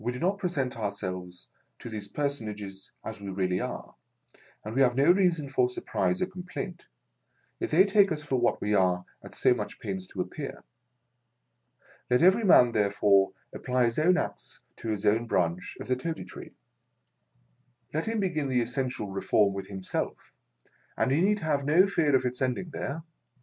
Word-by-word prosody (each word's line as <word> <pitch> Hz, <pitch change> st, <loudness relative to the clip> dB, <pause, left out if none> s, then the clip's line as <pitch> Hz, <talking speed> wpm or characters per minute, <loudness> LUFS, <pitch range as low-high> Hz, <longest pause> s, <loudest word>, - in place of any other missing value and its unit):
We 120 Hz, -, 0 dB
do -, -, -5 dB
not 190 Hz, +7 st, 0 dB
present 145 Hz, -, -1 dB
ourselves 90 Hz, -4 st, -4 dB, 0.3 s
to -, -, -10 dB
these 105 Hz, -3 st, -5 dB
personages 105 Hz, -7 st, -4 dB
as 100 Hz, -, -6 dB
we 100 Hz, -, -6 dB
really 95 Hz, -1 st, 0 dB
are, -, -, -5 dB, 0.7 s
and 105 Hz, -, -5 dB
we 135 Hz, -, +2 dB
have 125 Hz, -2 st, +4 dB
no 140 Hz, +5 st, +6 dB
reason 175 Hz, -6 st, +2 dB
for 130 Hz, -2 st, +2 dB
surprise 180 Hz, +8 st, -1 dB
or -, -, +2 dB
complaint, 180 Hz, -1 st, -7 dB, 0.7 s
if 355 Hz, -, -2 dB
they 190 Hz, -, +6 dB
take 200 Hz, -1 st, +4 dB
us 150 Hz, -1 st, -2 dB
for 135 Hz, -3 st, 0 dB
what 120 Hz, -, +1 dB
we 105 Hz, -, 0 dB
are 90 Hz, -2 st, +2 dB, 0.2 s
at -, -, -10 dB
so -, -, +4 dB
much -, -, -5 dB
pains 95 Hz, -1 st, -5 dB
to -, -, -4 dB
appear. -, -, -6 dB, 1.5 s
Let 125 Hz, +5 st, +3 dB
every 190 Hz, +6 st, +5 dB
man, 125 Hz, -, +6 dB
therefore, 100 Hz, -2 st, +3 dB, 0.2 s
apply 125 Hz, -1 st, +1 dB
his 115 Hz, +4 st, 0 dB
own 180 Hz, +4 st, +4 dB
axe -, -, -5 dB, 0.2 s
to 115 Hz, -, -5 dB
his 105 Hz, -1 st, -2 dB
own 110 Hz, +3 st, +2 dB
branch 85 Hz, -4 st, -1 dB
of -, -, -7 dB
the 130 Hz, -, +2 dB
Toady 160 Hz, +5 st, -4 dB
Tree. -, -, -11 dB, 1.4 s
Let 155 Hz, +6 st, -1 dB
him 225 Hz, 0 st, 0 dB
begin 155 Hz, -7 st, -1 dB
the 125 Hz, -1 st, +2 dB
essential 120 Hz, -3 st, -2 dB
Reform 100 Hz, +1 st, +2 dB
with 95 Hz, -1 st, -5 dB
himself, 95 Hz, -2 st, -4 dB, 0.6 s
and -, -, +1 dB
he 145 Hz, +5 st, +3 dB
need 205 Hz, +2 st, +2 dB
have 150 Hz, -3 st, 0 dB
no 160 Hz, +7 st, +5 dB
fear 165 Hz, -8 st, +2 dB
of 130 Hz, -1 st, +2 dB
its 125 Hz, +1 st, -2 dB
ending 130 Hz, +7 st, -1 dB
there. 155 Hz, +2 st, -4 dB
125 Hz, 175 wpm, -28 LUFS, 100-165 Hz, 1.5 s, no